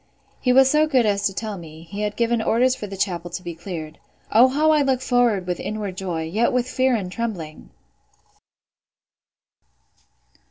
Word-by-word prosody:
He 250 - +1
was 265 +1 +6
so 305 +3 +3
good 260 -6 +3
as 200 -1 +1
to 195 - -5
tell 215 -3 -4
me, 160 -1 -11
he 200 +5 -7
had 210 0 -2
given 235 0 +1
orders 250 +3 +2
for 215 -5 -7
the 195 0 -8
chapel 175 -3 -2
to 175 +1 -6
be 175 -1 -5
cleared. 165 -2 -7 0.3
O 235 +4 +7
how 300 +4 +2
I 305 -1 +4
look 265 -2 +1
forward 245 -7 +1
with 180 -1 -3
inward 210 -3 -4
joy, 180 -4 -3
yet 210 +9 0
with 250 0 0
fear 255 0 +1
and 190 -5 -3
trembling! 185 -9 -5
210 Hz, 175 wpm, -22 LUFS, 180-250 Hz, 0.3 s, O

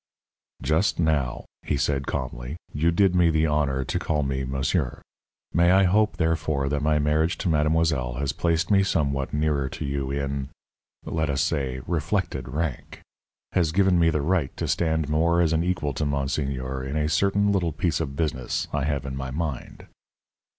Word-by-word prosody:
"Just 80 +6 +2
now," 75 -7 0 0.2
he 75 - -1
said, 70 0 0
calmly, 65 +1 -4 0.2
"you 80 +3 +2
did 95 +2 +3
me 90 -2 +4
the 80 0 +2
honor 70 -3 0
to - - -1
call 75 -2 0
me 65 -1 -2
'monsieur.' 65 +2 -1 0.5
May 85 +1 +4
I 95 +2 +5
hope, 100 0 +2
therefore 80 -5 0
that 75 0 -1
my 75 0 +2
marriage 75 +3 +1
to - - -3
mademoiselle 75 -5 +1
has 70 +1 -1
placed 85 +1 0
me 100 -1 +5
somewhat 70 -8 0
nearer 75 -3 0
to 75 +3 -5
you 70 -1 -2
in 70 -1 -2 0.6
let 80 -2 -1
us 70 -1 +1
say, 65 -4 -1
reflected 85 - -1
rank 75 0 -4 0.5
has 85 -4 +1
given 95 0 +3
me 85 -1 +4
the 75 -2 0
right 85 -4 +1
to 85 - -2
stand 80 -1 0
more 80 +3 +2
as 80 -2 +3
an 80 +1 +2
equal 85 -5 -1
to 75 - -2
monseigneur 70 -2 -2
in 70 +3 -3
a 75 0 +1
certain 100 +5 +2
little 90 -4 +1
piece 80 +1 -1
of 70 0 -3
business 70 -5 -2
I 70 - 0
have 70 -3 -1
in 65 -1 -4
my 65 0 -4
mind?" 75 -1 -5
75 Hz, 180 wpm, -25 LUFS, 70-85 Hz, 0.6 s, I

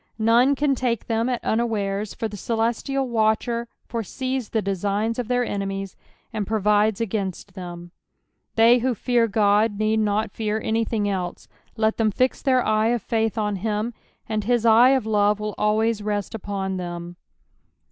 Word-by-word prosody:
None 235 +5 +4
can 285 0 +2
take 245 -3 -1
them 230 +1 0
at 245 - -2
unawares, 210 -3 -1
for 225 - -2
the 210 - -8
celestial 235 +6 -1
watcher 230 +1 0 0.2
foresees 255 +2 -3
the 225 - 0
designs 205 +3 -1
of 245 - -2
their 245 0 +1
enemies, 195 -2 -4 0.4
and 210 -3 -2
provides 210 -1 +2
agninst 200 -3 -3
them. 175 -2 -8 0.6
They 230 +2 +6
who 250 0 0
fear 240 0 +2
Ood 210 0 +2
need 215 +1 +1
not 215 +1 0
fear 215 -1 -2
any 225 +1 0
thing 210 -2 -1
else; 185 -3 -3 0.3
let 220 0 +1
them 225 -1 +2
fix 255 +5 0
their 255 -3 +2
eye 215 0 +2
of 235 -2 0
faith 225 -1 0
on 210 -2 0
him, 215 +4 -2 0.3
and 215 -2 -1
his 240 +1 +1
eye 235 +4 +7
uf 260 -5 -1
love 210 -1 +2
will 210 0 -3
always 215 +1 +1
rest 205 -1 -2
ujion 195 -3 -3
them. 175 -1 -6
220 Hz, 165 wpm, -23 LUFS, 205-235 Hz, 0.6 s, eye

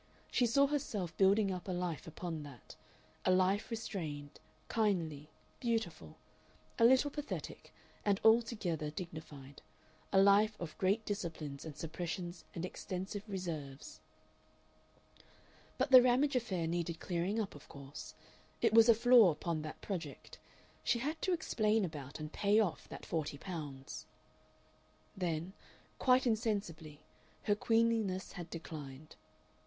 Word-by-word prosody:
She 245 - +3
saw 275 +5 +5
herself 220 - -2
building 195 +1 +4
up 180 0 -5
a - - -2
life 175 -3 -3
upon 165 0 -5
that 140 -6 -11 0.5
a - - +1
life 185 +4 +3
restrained, 160 -11 -5 0.3
kindly, 165 -9 0 0.3
beautiful, 215 - -2 0.6
a 230 - +7
little 260 +4 +5
pathetic 295 0 -6 0.3
and 200 -1 +2
altogether 220 -9 +3
dignified; 150 -4 -8 0.5
a 195 - +5
life 205 +2 +5
of 170 -3 -6
great 200 +4 +2
disciplines 165 -9 -4
and 155 -2 -8
suppressions 170 +1 -5
and 170 - -2
extensive 190 +2 -5
reserves... 155 -8 -5 1.8
But 265 +2 0
the 255 -1 +11
Ramage 255 +3 +3
affair 195 -9 0
needed 170 0 -2
clearing 180 +5 -1
up, 210 -3 -2
of 145 - -13
course; 140 0 -9 0.4
it 230 -2 +2
was 225 +1 +8
a 230 - +8
flaw 235 -3 +7
upon 160 0 -2
that 155 0 -7
project. 165 -8 -6 0.4
She 240 - +2
had 300 +7 -3
to 375 - +1
explain 220 - +1
about 145 -4 -7
and 155 0 -6
pay 205 +1 +3
off 205 -7 -1
that - - -8
forty 155 -3 -2
pounds.... 145 -7 -7 1.1
Then, 175 -1 -2 0.5
quite 255 0 +4
insensibly, 200 - -1 0.4
her 205 - +3
queenliness 225 -3 +1
had 175 -2 -7
declined. 155 -3 -8
185 Hz, 130 wpm, -35 LUFS, 160-220 Hz, 1.8 s, the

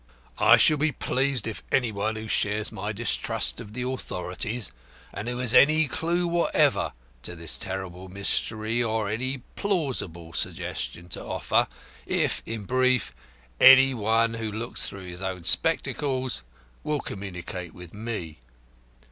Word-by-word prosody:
I - - +7
shall 155 - +5
be 155 +2 +2
pleased 135 -3 0
if 110 - -4
any 125 -4 +2
one 105 +2 -2
who 110 0 -6
shares 105 0 +1
my 105 -1 -4
distrust 65 - 0
of 105 - -9
the 125 +1 -3
authorities, 105 - -4 0.4
and 100 +3 -5
who 125 0 -2
has 125 -1 0
any 155 +3 +6
clue 170 +6 0
whatever 170 0 +2 0.3
to 90 - -7
this 85 -1 -1
terrible 95 -1 -4
mystery 110 +4 0
or 110 -2 0
any 130 +5 -2
plausible 125 - -2
suggestion 85 +1 -4
to - - -3
offer, - - +1 0.4
if, - - +1
in 115 -2 -4
brief, 130 +3 +2 0.5
any 135 0 +9
'One 115 0 +2
who 115 -2 -3
looks 115 +3 -2
through 95 -1 -9
his 90 0 -8
own 95 -2 -4
spectacles' 130 - 0 0.4
will 150 -1 -1
communicate 90 -2 -6
with 90 -2 -10
me. 105 - -5
110 Hz, 140 wpm, -26 LUFS, 95-130 Hz, 0.5 s, any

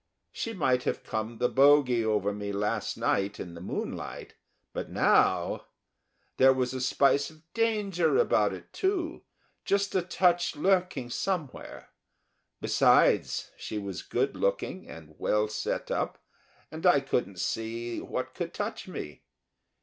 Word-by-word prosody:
She 230 - -4
might 130 - +2
have - - -1
come 110 +1 -4
the 125 - +2
bogy 135 -3 +5
over 105 -2 +1
me 100 0 -4
last 100 +1 -2
night 100 +1 0
in 90 - -6
the 85 - -10
moonlight, 90 - -5 0.4
but - - -4
now... - - +2 0.7
There 130 0 +7
was 130 -1 -1
a 130 - -3
spice 140 +2 +3
of 155 0 -19
danger 210 - +1
about 475 - +3
it, - - -10
too, 370 -4 -1 0.4
just 200 0 +1
a 185 - +2
touch 175 -1 +2
lurking 180 -6 +1
somewhere. 170 -3 -4 0.7
Besides, - - +3
she 110 - -5
was 100 -4 -5
good 130 +3 -1
looking - - -2
and 80 -1 -11
well 105 0 +1
set 105 - -3
up, - - -1 0.5
and 160 +1 -8
I 160 -5 +6
couldn't 120 -8 -2
see 115 +5 -3
what - - -4
could - - -5
touch - - -4
me. 75 - -7
130 Hz, 140 wpm, -28 LUFS, 110-180 Hz, 0.7 s, There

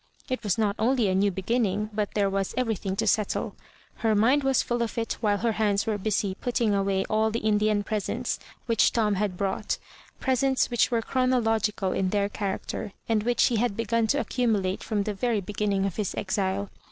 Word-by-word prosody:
It 255 -2 -2
was 205 -4 0
not 210 -2 +1
only 235 -2 +2
a - - +1
new 200 +2 +3
beginning, 210 +2 -1
but 210 -1 -2
there 205 -2 +3
was 195 0 -2
everything 220 -6 -1
to - - -1
settle. 215 -2 0 0.4
Her 220 -2 +1
mind 255 +7 +4
was 270 -1 +2
full 240 0 -1
of 230 0 -2
it 225 -1 -1
while 205 -2 +2
her 230 +2 +1
hands 210 -2 +1
were 215 -2 -1
busy 200 -1 0
putting 235 +1 0
away 195 -1 +1
all 220 +1 +2
the 225 - -2
Indian 210 -1 +2
presents 220 +4 -2 0.3
which 230 -2 +3
Tom 215 -3 +2
had 195 -2 -1
brought 195 +1 -1 0.2
— - - -26
presents 265 0 +1
which 240 - +3
were 230 -2 0
chronological 225 -7 +1
in 185 0 0
their 200 0 +1
character, 200 0 -4
and 225 -2 +2
which 240 +2 +2
he 235 - +2
had 220 -2 0
begun 230 0 +1
to 285 +5 +2
accumulate 215 -9 0
from 210 -3 -1
the 210 - -2
very 225 +2 0
beginning 200 0 -1
of 195 - -3
his 210 -4 -2
exile. 195 0 -1
215 Hz, 200 wpm, -26 LUFS, 200-230 Hz, 0.4 s, mind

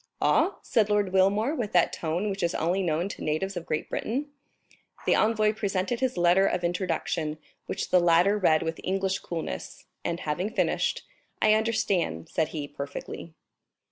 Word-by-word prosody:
"Aw?" - - +3
said 220 -4 +2
Lord 205 -2 +1
Wilmore, 200 +8 +3
with 235 -9 -3
that 175 -2 +4
tone 175 +6 -1
which 195 - -4
is 170 - 0
only 175 +4 +1
known 170 0 0
to - - -7
natives 175 +6 -1
of 175 -1 -5
Great 155 - -2
Britain. 280 +6 -3 0.7
The - - +4
envoy 215 -1 +3
presented 205 +1 -1
his 260 -4 0
letter 175 +3 +4
of 180 - -1
introduction, 170 -3 -1 0.3
which - - -3
the 180 - +6
latter 175 +3 +4
read 155 -5 +3
with 160 0 -4
English 190 0 0
coolness, 165 -2 -6 0.2
and 170 +1 -2
having 175 +6 -1
finished: - - 0 0.4
"I 215 - +5
understand," 200 - 0
said 160 - 0
he, 150 -3 -5
"perfectly." 145 +3 -7
185 Hz, 165 wpm, -27 LUFS, 165-210 Hz, 0.7 s, the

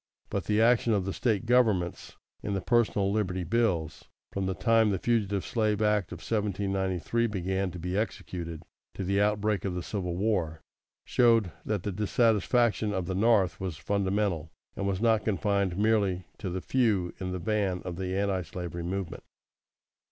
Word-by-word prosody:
But - - -2
the 105 0 +1
action 115 0 +4
of 100 -3 +1
the 95 - -2
State 115 -3 0
governments 110 -8 +1 0.2
in 100 - -2
the 95 - -1
personal 105 -3 +2
liberty 95 -4 -1
bills, 85 -5 0 0.3
from 95 -1 -2
the 95 - -1
time 115 +2 +3
the 100 - +1
Fugitive 100 -2 0
Slave 110 -3 0
Act 105 -4 +1
of 90 0 -7
1793 100 +1 -1
began 95 -1 -1
to 90 - -8
be 90 +2 -3
executed 85 -6 -4 0.3
to - - -3
the 100 +2 +1
outbreak 105 -1 +1
of 95 -3 -2
the 90 - -3
Civil 90 -4 -3
War, 90 -6 -1 0.4
showed 115 -6 +3
that 105 -4 -2
the 105 - -2
dissatisfaction 110 +2 +2
of 95 -2 -1
the 95 - -3
North 100 -1 +3
was 90 -5 -4
fundamental, 100 -4 -1 0.3
and 100 - -2
was 95 0 -1
not 115 -2 +3
confined 100 -3 0
merely 100 -4 +2
to 100 -5 -3
the 90 +1 -3
few 105 -9 +1
in 90 -1 -3
the 90 - -2
van 95 0 -1
of 90 -2 -5
the 95 0 -2
Antislavery 90 -3 -2
movement. 90 0 -4
100 Hz, 165 wpm, -28 LUFS, 90-110 Hz, 0.4 s, action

